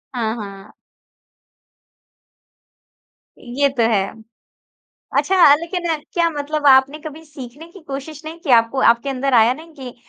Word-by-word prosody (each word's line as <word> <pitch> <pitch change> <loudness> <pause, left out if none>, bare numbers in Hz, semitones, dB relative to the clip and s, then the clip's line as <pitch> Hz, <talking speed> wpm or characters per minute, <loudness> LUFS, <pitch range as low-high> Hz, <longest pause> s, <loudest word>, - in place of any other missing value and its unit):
हाँ, 225 -2 -2
हाँ। 200 -2 -10 2.7
ये 270 +3 -1
तो 260 -4 -1
है। 195 -3 +1 1.1
अच्छा 385 - +1 0.2
अ, - - +7
लेकिन 345 +1 -5 0.3
क्या 340 -1 +1
मतलब 300 -1 -4
आपने 270 +2 +4
कभी 310 0 -10
सीखने 290 +1 -11
की 390 - -14
कोशिश 290 +1 -8
नहीं 320 +2 -8
की? 330 - -9
आपको 230 +2 +3
आपके 235 +4 0
अंदर 270 0 -2
आया 235 +1 +5
नहीं 320 +3 -14
कि 255 -3 -9
275 Hz, 135 wpm, -19 LUFS, 240-310 Hz, 2.7 s, अ